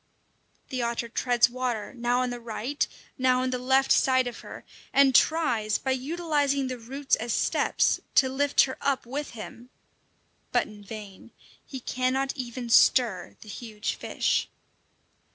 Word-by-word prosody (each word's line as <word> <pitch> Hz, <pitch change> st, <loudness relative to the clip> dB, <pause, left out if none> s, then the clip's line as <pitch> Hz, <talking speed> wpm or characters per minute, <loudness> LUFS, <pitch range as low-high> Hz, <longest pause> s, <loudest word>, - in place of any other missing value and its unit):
The 255 Hz, -2 st, -2 dB
otter 235 Hz, 0 st, -2 dB
treads 245 Hz, 0 st, +3 dB
water 245 Hz, -3 st, -3 dB
now 245 Hz, 0 st, 0 dB
on 250 Hz, -1 st, -1 dB
the 245 Hz, -, -5 dB
right, 235 Hz, +4 st, -2 dB, 0.3 s
now 255 Hz, 0 st, +3 dB
on 255 Hz, -, -1 dB
the 250 Hz, -, -2 dB
left 265 Hz, +2 st, +2 dB
side 260 Hz, -1 st, +4 dB
of 245 Hz, -2 st, -6 dB
her, -, -, -10 dB, 0.3 s
and 275 Hz, -1 st, +5 dB
tries, 240 Hz, -8 st, +3 dB
by 265 Hz, -, -2 dB
utilizing 285 Hz, 0 st, 0 dB
the 255 Hz, -1 st, -4 dB
roots 270 Hz, +4 st, -1 dB
as 230 Hz, 0 st, -3 dB
steps, -, -, +1 dB, 0.2 s
to 265 Hz, -, +6 dB
lift 275 Hz, +2 st, +2 dB
her 260 Hz, -, -1 dB
up 275 Hz, -2 st, 0 dB
with 285 Hz, +5 st, -4 dB
him. 235 Hz, +3 st, -9 dB, 0.8 s
But -, -, +2 dB
in 210 Hz, -1 st, -13 dB
vain; 205 Hz, 0 st, -10 dB, 0.4 s
he 265 Hz, -, -6 dB
cannot 255 Hz, +2 st, -1 dB
even 245 Hz, -2 st, -5 dB
stir 230 Hz, -5 st, +4 dB
the -, -, -13 dB
huge 215 Hz, 0 st, -4 dB
fish! -, -, -1 dB
255 Hz, 150 wpm, -27 LUFS, 235-270 Hz, 0.8 s, to